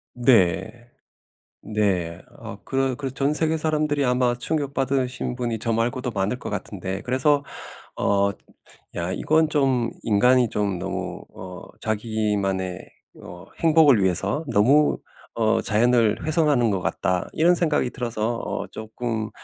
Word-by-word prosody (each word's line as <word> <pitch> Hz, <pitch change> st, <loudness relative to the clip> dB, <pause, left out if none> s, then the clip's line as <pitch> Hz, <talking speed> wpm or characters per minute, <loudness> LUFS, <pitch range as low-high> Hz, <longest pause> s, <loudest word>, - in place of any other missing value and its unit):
네. 120 Hz, -1 st, +2 dB, 0.7 s
네. 95 Hz, -6 st, -1 dB, 0.2 s
어 -, -, -8 dB
그 135 Hz, -1 st, 0 dB
그래서 135 Hz, -2 st, -5 dB
전 140 Hz, +2 st, +1 dB
세계 160 Hz, +1 st, +1 dB
사람들이 150 Hz, -2 st, 0 dB
아마 125 Hz, -1 st, +2 dB
충격받으신 135 Hz, -3 st, -1 dB
분이 120 Hz, -3 st, -2 dB
저 115 Hz, -, -1 dB
말고도 120 Hz, +2 st, -1 dB
많을 100 Hz, +3 st, -1 dB
것 -, -, -7 dB
같은데 95 Hz, -1 st, -4 dB
그래서 140 Hz, +3 st, +2 dB, 0.6 s
어 100 Hz, 0 st, +2 dB, 0.6 s
'야 85 Hz, +1 st, -1 dB
이건 155 Hz, +9 st, +2 dB
좀 135 Hz, -6 st, +1 dB
인간이 120 Hz, +3 st, +4 dB
좀 100 Hz, -3 st, -1 dB
너무 -, -, -5 dB
어 90 Hz, -1 st, -9 dB, 0.2 s
자기만의 105 Hz, -4 st, -1 dB, 0.4 s
어 90 Hz, 0 st, -11 dB
행복을 155 Hz, -9 st, +5 dB
위해서 100 Hz, -, 0 dB
너무 130 Hz, +7 st, +3 dB, 0.4 s
어 115 Hz, 0 st, +2 dB
자연을 115 Hz, 0 st, +2 dB
훼손하는 150 Hz, -7 st, +2 dB
것 95 Hz, -, -1 dB
같다.' 90 Hz, 0 st, -1 dB
이런 170 Hz, +3 st, +4 dB
생각이 155 Hz, -7 st, +1 dB
들어서 120 Hz, -2 st, -2 dB
'어 -, -, -4 dB
쪼끔 110 Hz, 0 st, -4 dB
120 Hz, 255 characters per minute, -23 LUFS, 105-135 Hz, 0.7 s, 행복을